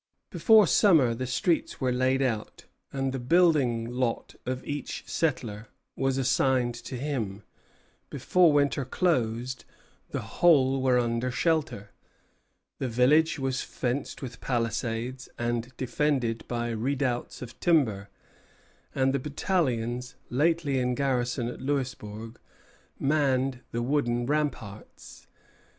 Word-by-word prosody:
Before 220 Hz, -2 st, +6 dB
summer 175 Hz, -4 st, +5 dB
was -, -, 0 dB
over, -, -, -2 dB
the 130 Hz, -, -2 dB
streets 145 Hz, +6 st, 0 dB
were 130 Hz, -2 st, +1 dB
laid 130 Hz, +2 st, +2 dB
out, 115 Hz, -5 st, -3 dB, 0.3 s
and 135 Hz, -1 st, -2 dB
the 135 Hz, -, -3 dB
building 130 Hz, -5 st, +3 dB
lot 125 Hz, -1 st, -2 dB
of 130 Hz, 0 st, -3 dB
each 145 Hz, -2 st, -5 dB
settler 115 Hz, -9 st, -2 dB, 0.3 s
was 135 Hz, 0 st, 0 dB
assigned 130 Hz, -1 st, +2 dB
to 120 Hz, +2 st, -7 dB
him; 115 Hz, -8 st, -3 dB, 0.7 s
before 180 Hz, -3 st, +3 dB
winter 140 Hz, -1 st, +2 dB
closed, 125 Hz, -5 st, -1 dB, 0.5 s
the -, -, -3 dB
whole 135 Hz, -6 st, +3 dB
were 130 Hz, -1 st, +3 dB
under 120 Hz, +1 st, 0 dB
shelter, 145 Hz, -, -1 dB, 0.9 s
the 130 Hz, -, -1 dB
village 145 Hz, +8 st, +3 dB
was 135 Hz, -2 st, -1 dB
fenced 130 Hz, +3 st, -3 dB
with 125 Hz, -1 st, -8 dB
palisades 120 Hz, +1 st, -2 dB
and 120 Hz, +1 st, -2 dB
defended 130 Hz, -2 st, -1 dB
by 120 Hz, -1 st, -2 dB
redoubts 125 Hz, +2 st, -2 dB
of 120 Hz, -2 st, -11 dB
timber, 110 Hz, -, +2 dB, 0.9 s
and 135 Hz, 0 st, +2 dB
the 140 Hz, -, +1 dB
battalions 125 Hz, -, -1 dB, 0.2 s
lately 150 Hz, 0 st, +1 dB
in 125 Hz, 0 st, 0 dB
garrison 125 Hz, -3 st, 0 dB
at 120 Hz, -, -7 dB
Louisbourg 120 Hz, -5 st, -4 dB, 0.6 s
manned 135 Hz, -3 st, +1 dB
the 120 Hz, 0 st, -2 dB
wooden 120 Hz, -3 st, 0 dB
ramparts. 135 Hz, -8 st, -4 dB
130 Hz, 120 wpm, -27 LUFS, 120-140 Hz, 0.9 s, Before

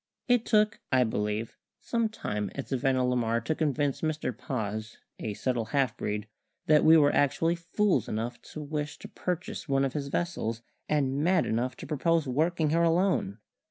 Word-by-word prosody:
It 245 Hz, -2 st, +3 dB
took 210 Hz, -2 st, +3 dB
(I 130 Hz, -1 st, +5 dB
believe) 105 Hz, 0 st, -2 dB, 0.2 s
some 230 Hz, -2 st, 0 dB
time 105 Hz, -, -3 dB
at 140 Hz, -, -5 dB
Savannah 130 Hz, -1 st, +1 dB
la 125 Hz, 0 st, +1 dB
Mar 115 Hz, -1 st, +1 dB
to 115 Hz, -, -1 dB
convince 145 Hz, -3 st, 0 dB
Mr 155 Hz, -6 st, -2 dB
Paz, 110 Hz, -3 st, -4 dB, 0.2 s
a 105 Hz, -2 st, -4 dB
subtle 125 Hz, -2 st, -1 dB
half 130 Hz, 0 st, 0 dB
breed, 105 Hz, -2 st, -3 dB, 0.4 s
that 150 Hz, -1 st, +5 dB
we 160 Hz, +1 st, +8 dB
were 145 Hz, -2 st, +4 dB
actually 165 Hz, +4 st, +2 dB
fools 170 Hz, -, 0 dB
enough 115 Hz, +3 st, -3 dB
to 155 Hz, -, -5 dB
wish 150 Hz, 0 st, -4 dB
to -, -, -10 dB
purchase 180 Hz, -3 st, -4 dB
one 135 Hz, 0 st, +3 dB
of 135 Hz, -, -2 dB
his 145 Hz, -2 st, -3 dB
vessels, 120 Hz, -8 st, -2 dB, 0.3 s
and 140 Hz, -1 st, +1 dB
mad 180 Hz, 0 st, +3 dB
enough 120 Hz, +3 st, -1 dB
to -, -, -8 dB
propose 165 Hz, 0 st, +1 dB
working 155 Hz, +4 st, +1 dB
her 165 Hz, +1 st, +3 dB
alone. 170 Hz, -, +2 dB
140 Hz, 175 wpm, -29 LUFS, 115-165 Hz, 0.4 s, we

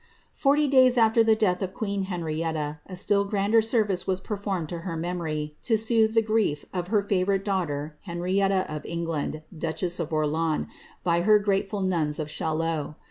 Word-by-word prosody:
'orty 290 Hz, +1 st, +4 dB
days 255 Hz, -2 st, +5 dB
after 225 Hz, 0 st, +5 dB
the 220 Hz, -1 st, +4 dB
death 185 Hz, -5 st, +1 dB
of 190 Hz, 0 st, -3 dB
queen 200 Hz, -3 st, -2 dB
Henrietta, 160 Hz, -4 st, -3 dB
a 185 Hz, -, -7 dB
still 200 Hz, +2 st, +2 dB
grander 205 Hz, +2 st, +2 dB
sen'ice 205 Hz, -5 st, +1 dB
performed 200 Hz, -5 st, -3 dB
to 170 Hz, +2 st, -5 dB
her 165 Hz, -1 st, -5 dB
memory, 160 Hz, -3 st, -3 dB
to 225 Hz, -3 st, +2 dB
soothe 220 Hz, 0 st, +2 dB
the 225 Hz, -, +5 dB
grief 215 Hz, -9 st, 0 dB
of 180 Hz, -1 st, -2 dB
her 205 Hz, +1 st, +2 dB
favourite 195 Hz, 0 st, 0 dB
^'hter, 160 Hz, -7 st, -1 dB
Henrietta 185 Hz, +2 st, 0 dB
of 155 Hz, -1 st, -5 dB
England, 165 Hz, -2 st, -3 dB
duchess 170 Hz, +3 st, -2 dB
of 165 Hz, -1 st, -3 dB
Orleans, 155 Hz, +1 st, 0 dB, 0.4 s
by 170 Hz, -1 st, +2 dB
her 210 Hz, +4 st, +6 dB
grateful 200 Hz, 0 st, -1 dB
nuns 165 Hz, -6 st, 0 dB
'haillot. 155 Hz, 0 st, -2 dB
185 Hz, 160 wpm, -26 LUFS, 160-210 Hz, 0.4 s, her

